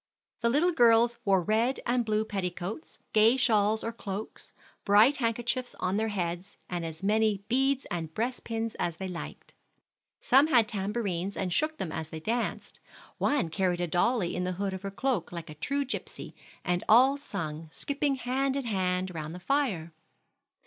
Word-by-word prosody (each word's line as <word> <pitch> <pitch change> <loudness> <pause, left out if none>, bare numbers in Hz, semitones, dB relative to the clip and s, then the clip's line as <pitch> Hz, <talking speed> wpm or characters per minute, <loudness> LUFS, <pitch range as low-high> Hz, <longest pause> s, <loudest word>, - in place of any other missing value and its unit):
The 235 - +3
little 305 +8 +3
girls 235 -4 +4
wore 190 -3 +3
red 225 +7 +1
and 245 0 +2
blue 215 -1 0
petticoats, 195 - -5 0.2
gay 225 +4 +5
shawls 220 -4 +3
or 230 - -2
cloaks, 205 -1 -6 0.3
bright 215 +8 +5
handkerchiefs 240 +1 -1
on 185 +2 0
their 220 +1 +1
heads, 180 -2 -4
and 175 -2 -3
as 160 +2 -6
many 210 -1 +2
beads 270 +3 +1
and 165 -3 -3
breastpins 230 +1 -3
as 170 -2 -1
they 190 - -4
liked. 180 -2 -8 0.7
Some 270 +4 +5
had 240 -8 +4
tamborines, 200 -2 -2
and 185 -2 -1
shook 310 - 0
them 175 - -4
as 160 0 -5
they 160 - -6
danced; 230 +8 -3 0.4
one 275 - +1
carried 180 +1 0
a 175 - +1
dolly 180 +3 +1
in 180 - -1
the 185 0 -1
hood 195 +1 -2
of 190 - -5
her 200 - -4
cloak 200 -2 -1
like 170 -3 -7
a - - -7
true 280 - -1
gypsy, 265 - -5 0.3
and 180 -1 0
all 255 +5 +7
sung, 160 - -5
skipping 285 - -1
hand 265 +2 -1
in 275 -2 -2
hand 185 -3 -1
round 155 0 -5
the - - -7
fire. 190 - -1
210 Hz, 170 wpm, -29 LUFS, 180-245 Hz, 0.7 s, all